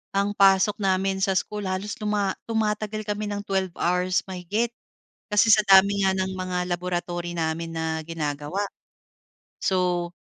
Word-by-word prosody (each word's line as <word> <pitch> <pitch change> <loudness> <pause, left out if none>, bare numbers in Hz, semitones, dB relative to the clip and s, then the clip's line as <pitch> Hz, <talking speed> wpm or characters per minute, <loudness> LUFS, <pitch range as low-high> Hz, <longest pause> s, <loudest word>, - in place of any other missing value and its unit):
ang 200 +1 +2
pasok 195 +1 +4
namin 190 -1 +1
sa 190 -1 +1
school, 210 +1 -2
halos 190 +3 -3
tuma 210 -2 0 0.2
tumatagal 215 -1 -1
kami 210 0 -3
ng 205 0 -4
12 190 -3 -2
hours 180 0 +1
mahigit, 200 +6 -2 0.6
kasi 210 +2 +4
sa 215 -1 +6
dami 200 0 +5
nga 190 - +4
ng 190 0 -2
mga 180 -1 -2
laboratory 175 -1 -3
namin 165 0 -2
na 160 -1 -2
ginagawa. 155 +4 -3 0.9
So, 180 -2 +1
190 Hz, 140 wpm, -25 LUFS, 175-205 Hz, 0.9 s, sa